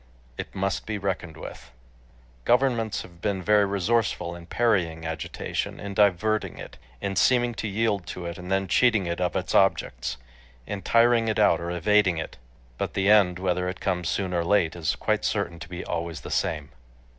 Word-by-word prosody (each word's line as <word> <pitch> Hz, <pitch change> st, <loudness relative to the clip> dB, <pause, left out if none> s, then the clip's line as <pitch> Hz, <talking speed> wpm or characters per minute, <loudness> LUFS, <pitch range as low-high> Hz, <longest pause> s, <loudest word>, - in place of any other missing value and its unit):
It -, -, -7 dB
must 95 Hz, 0 st, -2 dB
be 105 Hz, -1 st, -2 dB
reckoned 95 Hz, -5 st, -3 dB
with.... -, -, -9 dB, 0.7 s
Governments 120 Hz, -, +2 dB
have 85 Hz, -1 st, -15 dB
been 100 Hz, -3 st, -1 dB
very 105 Hz, +1 st, +4 dB
resourceful 100 Hz, -3 st, 0 dB
in 85 Hz, -1 st, -11 dB
parrying 90 Hz, -9 st, +1 dB
agitation, 80 Hz, -1 st, -4 dB
in 100 Hz, -1 st, -6 dB
diverting 105 Hz, +2 st, +2 dB
it, -, -, -10 dB, 0.2 s
in 100 Hz, -1 st, -2 dB
seeming 120 Hz, +4 st, +3 dB
to 110 Hz, -, -2 dB
yield 105 Hz, -3 st, 0 dB
to 90 Hz, 0 st, -6 dB
it, 85 Hz, +1 st, -5 dB
and 90 Hz, +1 st, -7 dB
then 95 Hz, 0 st, +1 dB
cheating 110 Hz, -1 st, +3 dB
it 85 Hz, +1 st, -3 dB
of 90 Hz, -, 0 dB
its -, -, -2 dB
objects, -, -, +1 dB, 0.5 s
in 105 Hz, -1 st, -5 dB
tiring 115 Hz, +1 st, +4 dB
it 110 Hz, -, 0 dB
out 95 Hz, -6 st, +4 dB
or 85 Hz, -, -4 dB
evading 90 Hz, +1 st, +3 dB
it.... 80 Hz, -, -5 dB, 0.4 s
But -, -, -3 dB
the 100 Hz, +1 st, +3 dB
end, 95 Hz, -4 st, +5 dB
whether 90 Hz, -1 st, 0 dB
it 90 Hz, -, -6 dB
comes 90 Hz, -4 st, -1 dB
soon 95 Hz, +1 st, -1 dB
or 85 Hz, -1 st, +1 dB
late, 90 Hz, -2 st, +2 dB
is 85 Hz, -3 st, -1 dB
quite -, -, 0 dB
certain 85 Hz, -1 st, -1 dB
to 80 Hz, -, -9 dB
be 90 Hz, 0 st, -6 dB
always 85 Hz, -1 st, -4 dB
the -, -, -8 dB
same. 75 Hz, -4 st, -1 dB
95 Hz, 185 wpm, -26 LUFS, 85-105 Hz, 0.7 s, end